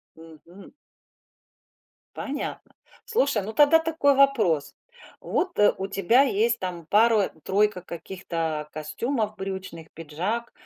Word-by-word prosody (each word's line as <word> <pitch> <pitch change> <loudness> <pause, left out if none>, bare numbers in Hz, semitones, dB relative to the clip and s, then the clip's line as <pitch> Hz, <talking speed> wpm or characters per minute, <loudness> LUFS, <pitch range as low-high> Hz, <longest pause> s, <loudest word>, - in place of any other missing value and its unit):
Мгм. 165 +4 -15 1.4
Понятно. 290 0 -6 0.3
Слушай, 280 - +1
ну 215 +3 -6
тогда 295 +6 +6
такой 320 -3 +2
вопрос. 230 - +2 0.5
Вот, 370 - -2
э, 210 - +5
у 190 - -3
тебя 200 +7 +3
есть 235 -2 +1
там 175 -3 -5
2 215 +2 +3 0.2
3 200 -1 +1
каких-то 165 -3 -5
костюмов 215 - -3
брючных, 190 -4 -6
пиджак. 180 +10 -4
200 Hz, 105 wpm, -25 LUFS, 170-245 Hz, 1.4 s, тогда